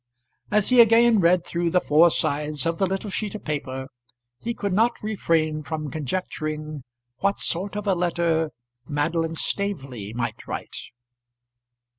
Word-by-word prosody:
As 210 -1 +2
he 250 -1 +8
again 230 0 +6
read 175 0 +4
through 170 0 -1
the 180 +2 +3
four 160 +1 +5
sides 150 -2 0
of 165 0 -1
the 195 - +3
little 195 +2 -3
sheet 210 +1 -3
of 215 - -7
paper, 135 -3 -3 0.5
he 235 0 -3
could 200 -3 -2
not 230 +5 +3
refrain 165 -7 0
from 150 0 -4
conjecturing 155 0 -3 0.4
what 200 - +1
sort 190 +4 -1
of 210 0 -3
a 195 - +3
letter 170 -2 +1 0.4
Madeline 165 +3 -1
Staveley 135 - -3
might 115 0 -4
write. - - -6
170 Hz, 145 wpm, -24 LUFS, 150-200 Hz, 0.5 s, he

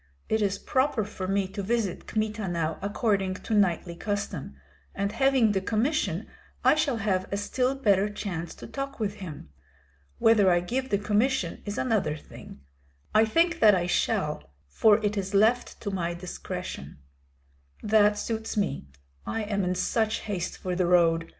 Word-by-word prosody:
It 220 - +1
is 200 -1 +1
proper 260 -5 0
for 195 -2 -6
me 195 0 +1
to 200 +1 -5
visit 210 -2 -1
Kmita 215 -1 -2
now 165 -2 -2
according 200 -2 0
to 220 - -5
knightly 180 -4 +1
custom, 200 - -4 0.4
and 200 0 -1
having 260 -2 +3
the 195 -2 0
commission 230 +10 0 0.4
I - - +6
shall 300 -5 +1
have 195 -3 -1
a 200 - 0
still 255 +6 0
better 205 -6 +2
chance 180 -5 -5
to - - -10
talk 275 -1 -5
with 210 -1 -2
him. 155 - -8 0.7
Whether 215 -4 +5
I 175 -1 +4
give 255 +8 -2
the 200 - +2
commission 210 -1 0
is 205 - -3
another 200 -11 0
thing; 70 - -13 0.5
I 220 +1 +6
think 335 +9 +2
that 210 -8 +7
I 175 -1 0
shall, 175 - 0 0.2
for 205 - +4
it 210 0 0
is 195 +1 -2
left 225 +5 +2
to 200 - -3
my 175 -3 -2
discretion." 180 - -6 0.9
"That 210 -1 +4
suits 220 0 -3
me; 160 - -1 0.4
I 225 - -2
am 205 -2 -1
in 180 0 0
such 220 +4 0
haste 185 -4 -4
for 180 -1 -3
the 180 -1 +1
road. 165 -2 +3
205 Hz, 165 wpm, -27 LUFS, 185-225 Hz, 0.9 s, that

